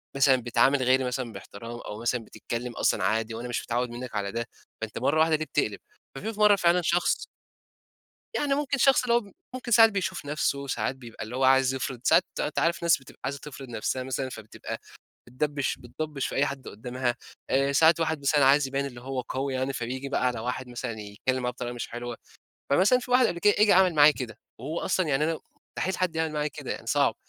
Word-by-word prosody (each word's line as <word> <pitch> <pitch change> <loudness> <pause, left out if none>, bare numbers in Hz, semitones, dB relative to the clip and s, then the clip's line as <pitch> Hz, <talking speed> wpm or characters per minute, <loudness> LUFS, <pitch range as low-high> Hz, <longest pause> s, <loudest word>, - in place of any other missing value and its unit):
مثلًا 140 -1 +5
بتعامل 130 +3 +3
غيري 130 +1 +3
مثلًا 125 -1 -3
بإحترام 115 +2 -9
أو 105 -1 -7
مثلًا 120 0 0
بتتكلّم 120 +2 -5
أصلًا 100 - +1
عادي، 110 +3 0
وأنا 120 +2 -5
مش 120 - -2
متعوّد 125 +1 -1
منّك 120 0 -7
على 100 -1 -1
ده، 115 +1 -3 0.3
فأنت 110 -1 -5
مرّة 145 +5 +2
وحدة 160 0 +4
ليه 155 +1 -2
بتقلب؟ 135 -8 -1 0.4
ففي 210 +9 -5
مرّة 210 -1 +7
فعلًا 175 -1 +3
شخص 175 +1 +1 1.1
يعني 285 -1 +1
ممكن 285 -1 0
شخص 270 0 +5
اللي 235 - +1
هو 230 -4 +1 0.2
ممكن 250 -1 -6
ساعات 225 0 +8
بيشوف 185 -5 -3
نفسه، 140 -1 -1
ساعات 130 - -1
بيبقى 120 -4 -9
اللي 110 +3 -7
هو 135 - 0
عايز 130 0 +5
يفرض 130 -1 -3
ساعات - - +5 0.2
أنت 150 - -1
عارف 170 +1 +1
ناس 170 -3 +5
بتبقى 135 - -16
عايزة 140 +1 -3
تفرض 135 -2 -9
نفسها 120 +2 -2
مثلًا، 130 0 -3
فبتبقى 110 -4 -7 0.5
بتدبش 145 +3 -1
بتضبش 140 +3 -4
في - - -5
أي 145 - +3
حد 140 -2 -6
قدامها، 120 +3 -3 0.3
آآ، 135 +1 +2
ساعات 160 +3 +5
الواحد 160 -2 0
مثلًا 140 0 +3
عايز 140 +1 +5
يبين 135 +1 -1
إنّه 125 -3 -7
هو 130 0 -3
قوي 135 +2 -3
يعني، 130 +1 -1
فبيجي 130 +2 -4
بقى 130 -2 0
على 125 -2 -1
واحد 125 +2 -4
مثلًا 120 0 -4
يتكلّم 110 +5 -2
معاه 125 0 -1
بطريقة 120 -1 -5
مش 120 - -5
حلوة، 120 0 -6 0.5
فمثلًا 190 - +5
في 250 0 -9
واحد 250 0 +5
قبل 170 - -2
كده 205 +4 +4
جه 210 -1 +6
عمل 185 -2 +5
معايا 150 0 +7
كده. 125 -5 -6 0.2
وهو 150 +8 -4
أصلًا 185 - 0
يعني 140 +1 +2
أنا 160 0 -1 0.4
مستحيل 190 0 -1
حد 180 -3 0
يعمل 160 -1 0
معايا 150 0 -1
كده، 145 - -8
يعني - - -8
صعب، - - +2
135 Hz, 210 wpm, -27 LUFS, 125-160 Hz, 1.1 s, ساعات